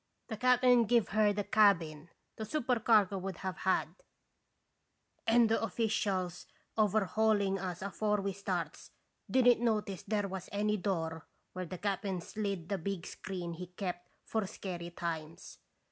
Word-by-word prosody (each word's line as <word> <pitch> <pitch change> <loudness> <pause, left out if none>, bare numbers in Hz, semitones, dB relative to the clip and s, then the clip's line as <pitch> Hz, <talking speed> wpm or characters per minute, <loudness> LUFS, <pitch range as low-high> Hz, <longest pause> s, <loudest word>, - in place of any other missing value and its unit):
The 220 - -4
cap'n 250 0 +5
give 235 0 +3
her 210 0 +3
the 205 0 -1
cabin 170 -7 +3 0.3
the 220 - -5
supercargo 225 -6 +2
would 190 -2 -5
have 185 0 -2
had, 190 -5 +1 1.4
and 230 0 +6
the 225 - +1
officials 200 -6 -1 0.3
overhauling 210 -1 +2
us 180 -1 -4
afore 210 +1 0
we 195 0 -2
starts 180 -5 -4 0.4
did 260 -1 +3
n't 245 -2 +6
notice 210 -5 0
there 205 -1 -1
was 190 -1 -6
any 210 +1 +1
door 165 -5 -2 0.3
where 185 -1 -4
the 185 - -6
cap'n 195 -1 -2
slid 195 -2 -4
the 200 - -1
big 185 +1 -3
screen 180 -3 -5
he 180 +2 -7
kept 180 -1 -5 0.2
for 220 -3 -1
scary 175 -3 -6
times. 165 -2 -6
195 Hz, 145 wpm, -33 LUFS, 180-215 Hz, 1.4 s, and